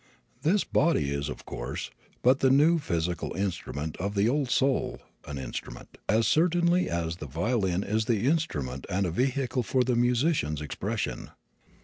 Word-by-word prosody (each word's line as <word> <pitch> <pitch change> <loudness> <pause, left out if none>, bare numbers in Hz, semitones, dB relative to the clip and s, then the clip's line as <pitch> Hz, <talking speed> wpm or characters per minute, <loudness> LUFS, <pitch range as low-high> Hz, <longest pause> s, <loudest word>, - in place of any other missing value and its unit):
The 180 +8 +2
body 140 - +3
is, 70 0 -2
of - - -7
course, - - -5 0.3
but 130 +2 +5
the 135 - +4
new 155 +5 +5
physical 85 - -2
instrument 85 -5 -3
of 100 +3 -3
the 100 +2 +3
old 135 +1 +1
soul 135 +1 +1 0.3
an 70 - -5
instrument, 65 - -7
as 110 +2 +3
certainly 175 +3 +3
as 85 -1 -2
the 75 - -7
violin 95 - 0
is 110 +2 0
the 110 -4 +1
instrument 75 - -1
and 95 +1 +1
a 90 - -1
vehicle 130 - 0
for 125 +2 +1
the 125 0 +1
musician's 120 - +1
expression. 75 -2 -3
110 Hz, 155 wpm, -28 LUFS, 80-135 Hz, 0.3 s, but